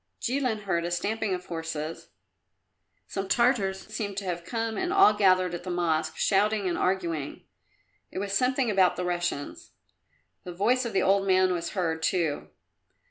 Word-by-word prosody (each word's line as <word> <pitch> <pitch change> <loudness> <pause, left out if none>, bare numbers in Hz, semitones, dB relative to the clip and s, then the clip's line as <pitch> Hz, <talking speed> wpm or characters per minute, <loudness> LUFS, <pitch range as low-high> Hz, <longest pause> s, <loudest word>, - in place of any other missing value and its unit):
Jilin 250 -4 -1
heard 170 -4 0
a 170 - -2
stamping 200 +3 -1
of 180 0 -8
horses; 160 -1 -5 1.0
some 195 -1 -4
Tartars 205 -4 +2
seemed 200 -3 -4
to 200 - -3
have 175 -2 -3
come 225 +2 -3
and 360 +8 -1
all 390 - +6
gathered 185 -3 +3
at 175 - -4
the 185 - -6
Mosque, 160 -3 0
shouting 205 0 +2
and 175 - 0
arguing. 170 -6 -2 0.7
It - - -9
was 200 +1 -3
something 250 +2 +2
about 190 -3 +3
the 180 - -3
Russians. 175 -5 -3 0.7
The 180 - -7
voice 245 +8 +1
of 230 - -4
the - - +2
old 195 +1 +3
man 185 -1 +4
was 170 -1 -4
heard, 165 -5 -1
too. 165 -4 -1
190 Hz, 165 wpm, -27 LUFS, 175-210 Hz, 1.0 s, all